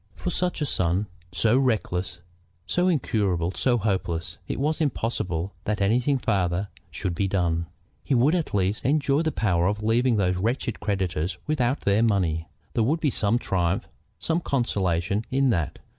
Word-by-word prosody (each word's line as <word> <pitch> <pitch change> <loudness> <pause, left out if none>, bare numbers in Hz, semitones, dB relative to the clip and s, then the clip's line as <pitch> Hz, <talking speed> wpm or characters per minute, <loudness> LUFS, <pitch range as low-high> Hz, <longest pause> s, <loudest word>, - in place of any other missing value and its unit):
For 180 - -3
such 180 -1 0
a - - +2
son, 90 - 0 0.3
so 110 +9 +3
reckless, 95 -8 -1 0.4
so 175 - +1
incurable, 100 - +1
so 120 +7 +1
hopeless, 90 -5 -2
it - - -3
was 150 +4 0
impossible 100 - -1
that 105 -1 -1
anything 120 +8 +2
farther 95 -4 0 0.2
should 90 - -3
be 95 +3 0
done. 85 -3 0 0.4
He 135 - +1
would 130 +6 +4
at 175 -3 0
least 100 +1 0
enjoy 140 +1 +2
the 160 -1 0
power 90 - +1
of 105 +1 -1
leaving 115 +2 +3
those 90 -2 +1
wretched 115 +3 -1
creditors 95 -4 -1
without 135 -3 0
their 100 +2 +2
money. 90 -8 +1 0.3
There 115 - +2
would 150 +9 +1
be 150 -4 +1
some 110 +1 +1
triumph, 90 -5 0 0.3
some 165 +1 0
consolation, 100 - 0
in 135 0 +2
that. 85 -8 -1
105 Hz, 160 wpm, -25 LUFS, 90-130 Hz, 0.4 s, would